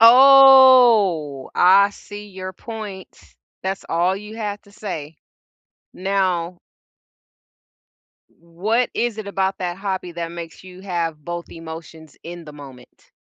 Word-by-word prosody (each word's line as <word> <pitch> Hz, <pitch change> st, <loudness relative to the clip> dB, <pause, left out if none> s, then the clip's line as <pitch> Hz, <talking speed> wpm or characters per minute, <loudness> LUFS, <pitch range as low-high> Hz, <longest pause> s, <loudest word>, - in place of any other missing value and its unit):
Oh! 245 Hz, -, +6 dB
I 195 Hz, +3 st, +5 dB
see 205 Hz, 0 st, -11 dB
your 185 Hz, -1 st, -8 dB
point. 210 Hz, -2 st, -9 dB, 0.4 s
That's 190 Hz, +1 st, -4 dB
all 175 Hz, +3 st, 0 dB
you 210 Hz, +2 st, -10 dB
have 205 Hz, -2 st, -5 dB
to 200 Hz, -, -22 dB
say. 165 Hz, -8 st, -7 dB, 0.8 s
Now 185 Hz, -2 st, -2 dB, 1.7 s
what 200 Hz, +9 st, -2 dB
is 235 Hz, -2 st, -2 dB
it 215 Hz, -, -6 dB
about 195 Hz, -1 st, -2 dB
that 180 Hz, -1 st, -4 dB
hobby 190 Hz, -2 st, -5 dB
that 170 Hz, 0 st, -5 dB
makes 170 Hz, -1 st, -9 dB
you 185 Hz, 0 st, -13 dB
have 170 Hz, -5 st, -4 dB
both 175 Hz, 0 st, -6 dB
emotions 160 Hz, -1 st, -11 dB
in 175 Hz, 0 st, -9 dB
the 150 Hz, -, -11 dB
moment? 135 Hz, -4 st, -15 dB
185 Hz, 120 wpm, -20 LUFS, 170-210 Hz, 1.7 s, Oh